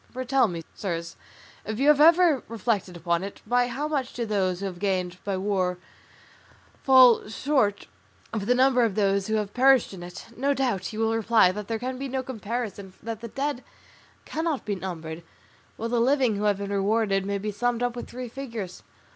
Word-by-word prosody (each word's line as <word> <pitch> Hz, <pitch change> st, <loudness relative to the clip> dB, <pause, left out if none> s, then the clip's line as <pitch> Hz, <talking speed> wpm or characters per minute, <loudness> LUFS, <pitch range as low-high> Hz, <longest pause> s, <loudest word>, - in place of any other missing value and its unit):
For 255 Hz, +1 st, -5 dB
tell 265 Hz, -1 st, +3 dB
me, 170 Hz, -4 st, -5 dB
sirs, 170 Hz, -4 st, -4 dB, 0.5 s
if 215 Hz, 0 st, -4 dB
you 275 Hz, +4 st, +1 dB
have 300 Hz, -1 st, +5 dB
ever 330 Hz, -3 st, +6 dB
reflected 210 Hz, -5 st, -2 dB
upon 170 Hz, +1 st, 0 dB
it, 195 Hz, -, -7 dB
by 245 Hz, +2 st, +2 dB
how 270 Hz, +5 st, -3 dB
much 280 Hz, -5 st, -2 dB
do 235 Hz, -, -3 dB
those 190 Hz, -4 st, 0 dB
who 200 Hz, -, -4 dB
have 180 Hz, -3 st, -5 dB
gained 185 Hz, -2 st, -1 dB
by 200 Hz, -2 st, -2 dB
war 185 Hz, -2 st, 0 dB, 1.0 s
fall 255 Hz, -5 st, +6 dB
short 220 Hz, -3 st, 0 dB, 0.5 s
of 210 Hz, -2 st, -3 dB
the 245 Hz, -, +4 dB
number 255 Hz, -1 st, +4 dB
of 220 Hz, -5 st, 0 dB
those 200 Hz, -2 st, +1 dB
who 220 Hz, -, 0 dB
have 210 Hz, -2 st, -2 dB
perished 260 Hz, -3 st, +4 dB
in 185 Hz, -, -9 dB
it? 175 Hz, 0 st, -9 dB
No 280 Hz, +3 st, +1 dB
doubt 240 Hz, -9 st, -1 dB
you 215 Hz, -, -7 dB
will 225 Hz, 0 st, +2 dB
reply 225 Hz, -4 st, +4 dB
that 210 Hz, +1 st, -6 dB
there 225 Hz, -, -1 dB
can 255 Hz, +2 st, -4 dB
be 275 Hz, -, -3 dB
no 260 Hz, 0 st, -2 dB
comparison, 220 Hz, -5 st, -5 dB
that 225 Hz, 0 st, -5 dB
the 235 Hz, -, -5 dB
dead 275 Hz, +2 st, -3 dB, 0.6 s
cannot 320 Hz, -3 st, -2 dB
be 210 Hz, -, -1 dB
numbered, 170 Hz, -4 st, -6 dB, 0.6 s
while 230 Hz, +1 st, -3 dB
the 240 Hz, 0 st, +1 dB
living 255 Hz, -3 st, +3 dB
who 205 Hz, +1 st, -2 dB
have 205 Hz, -2 st, +2 dB
been 200 Hz, 0 st, -4 dB
rewarded 200 Hz, 0 st, +1 dB
may 200 Hz, +1 st, -2 dB
be 210 Hz, +2 st, -3 dB
summed 245 Hz, +3 st, -1 dB
up 245 Hz, -1 st, -1 dB
with 240 Hz, -, -7 dB
three 250 Hz, +1 st, -6 dB
figures. 230 Hz, -7 st, -7 dB
220 Hz, 200 wpm, -26 LUFS, 195-255 Hz, 1.0 s, ever